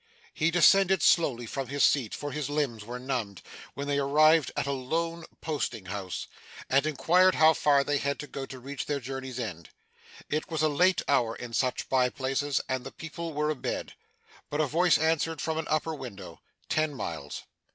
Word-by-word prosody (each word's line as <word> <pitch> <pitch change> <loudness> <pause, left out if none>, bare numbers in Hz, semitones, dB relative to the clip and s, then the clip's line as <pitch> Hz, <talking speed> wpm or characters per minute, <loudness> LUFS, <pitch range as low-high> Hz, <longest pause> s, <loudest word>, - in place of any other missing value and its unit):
He 155 - +1
descended 190 +1 +5
slowly 130 -8 +3
from 135 +3 -4
his 140 +2 0
seat 125 -7 +3
for 145 0 -5
his 145 0 -3
limbs 140 -7 -1
were 120 +3 -6
numbed 125 -7 -4 0.3
when 140 - -4
they 140 0 +1
arrived 155 +2 +4
at - - 0
a 140 - -1
lone 165 +5 -2 0.2
posting 150 - -3
house, 95 -1 -5 0.5
and 135 +3 +3
inquired 180 +5 +4
how 160 +1 +6
far 140 -2 +3
they 145 0 0
had 140 0 -1
to - - -6
go 135 -1 -6
to 130 - -8
reach 135 +2 -6
their 145 -1 -1
journey's 130 -1 -6
end. 90 -9 -5 0.6
It 155 +1 -2
was 160 -2 -1
a 155 - +4
late 180 +5 +3
hour 120 -5 +2
in 120 -1 -8
such 130 +1 0
by 130 -1 +3
places, 135 +2 -1
and 130 -1 -2
the - - -7
people 165 +1 -6
were 150 +1 0
abed; 150 - -4 0.6
but 145 - -3
a 155 - +3
voice 170 +5 +3
answered 160 0 0
from 160 0 -1
an 160 - -4
upper 155 +1 0
window, 100 - -9 0.3
Ten 155 -2 0
miles. 80 - -5
140 Hz, 190 wpm, -28 LUFS, 130-155 Hz, 0.6 s, how